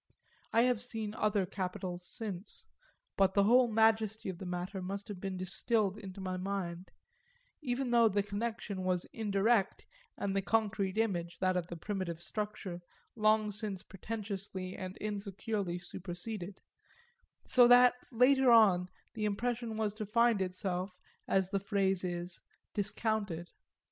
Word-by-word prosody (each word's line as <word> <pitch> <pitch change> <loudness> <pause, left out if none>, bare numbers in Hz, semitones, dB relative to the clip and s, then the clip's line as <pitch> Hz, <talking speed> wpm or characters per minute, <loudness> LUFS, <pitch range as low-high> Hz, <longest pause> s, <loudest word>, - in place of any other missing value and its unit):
I 230 - +5
have 250 -3 +2
seen 225 -3 -3
other 210 -3 +1
capitols 180 -1 -4
since, 200 -1 -5 0.5
but 190 -1 +3
the 200 - +5
whole 245 +4 +6
majesty 220 -2 +2
of 180 -2 -6
the 190 - -6
matter 180 +2 -4
must 195 +2 -4
have 200 -3 -6
been 195 -1 -3
then - - -5
distilled 210 +1 0
into 195 -2 -8
my 185 -1 -3
mind 185 -2 -4 0.7
even 255 -2 -1
though 235 -2 +6
the 205 0 +1
connection 205 -1 -3
was 185 -1 0
indirect 205 -1 +1 0.3
and 195 -1 -2
the 195 - +2
concrete 200 0 0
image, 175 -6 0
that 185 -1 +1
of 175 -2 -1
the 175 - -6
primitive 185 -2 -3
structure, 190 -1 -4 0.3
long 215 -1 +3
since 205 -2 -3
pretentiously 195 -2 -5
and 185 0 -6
insecurely 200 -2 -3
superseded 185 +2 -7 0.8
so 245 -1 +6
that, 245 0 +8 0.2
later 260 +2 +5
on, 195 -6 +6 0.2
the 215 -1 -2
impression 230 +2 -1
was 215 -2 0
to 215 -1 -5
find 235 -1 +3
itself, 185 0 -2 0.3
as 190 -1 +2
the 200 - +1
phrase 195 -2 +1
is, 175 0 -4 0.3
discounted. 205 -4 -1
200 Hz, 145 wpm, -33 LUFS, 185-220 Hz, 0.8 s, that